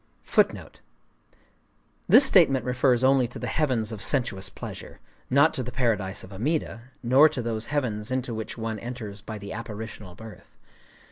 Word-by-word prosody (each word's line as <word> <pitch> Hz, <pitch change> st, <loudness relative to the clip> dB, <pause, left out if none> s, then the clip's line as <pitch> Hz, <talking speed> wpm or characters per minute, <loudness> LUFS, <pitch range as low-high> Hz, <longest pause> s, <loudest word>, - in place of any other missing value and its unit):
This 275 Hz, -, +8 dB
statement 140 Hz, -, +4 dB
refers 125 Hz, 0 st, +2 dB
only 130 Hz, -1 st, +4 dB
to 120 Hz, -, -9 dB
the -, -, -5 dB
Heavens 125 Hz, -8 st, 0 dB
of 110 Hz, -3 st, -7 dB
Sensuous 120 Hz, -5 st, 0 dB
Pleasure,—not 140 Hz, +4 st, -2 dB
to -, -, -3 dB
the 125 Hz, 0 st, -5 dB
Paradise 105 Hz, -7 st, -1 dB
of 95 Hz, -, -11 dB
Amida, 120 Hz, -, -2 dB, 0.2 s
nor 135 Hz, +6 st, +6 dB
to 150 Hz, -, -5 dB
those 115 Hz, -1 st, -3 dB
heavens 120 Hz, -8 st, -2 dB
into 130 Hz, -2 st, -2 dB
which 110 Hz, +1 st, -6 dB
one 110 Hz, -1 st, -4 dB
enters 110 Hz, -4 st, -7 dB
by 110 Hz, +1 st, -7 dB
the 100 Hz, -1 st, -8 dB
Apparitional 110 Hz, -4 st, -8 dB
Birth. 110 Hz, +2 st, -13 dB
120 Hz, 145 wpm, -26 LUFS, 110-130 Hz, 0.2 s, This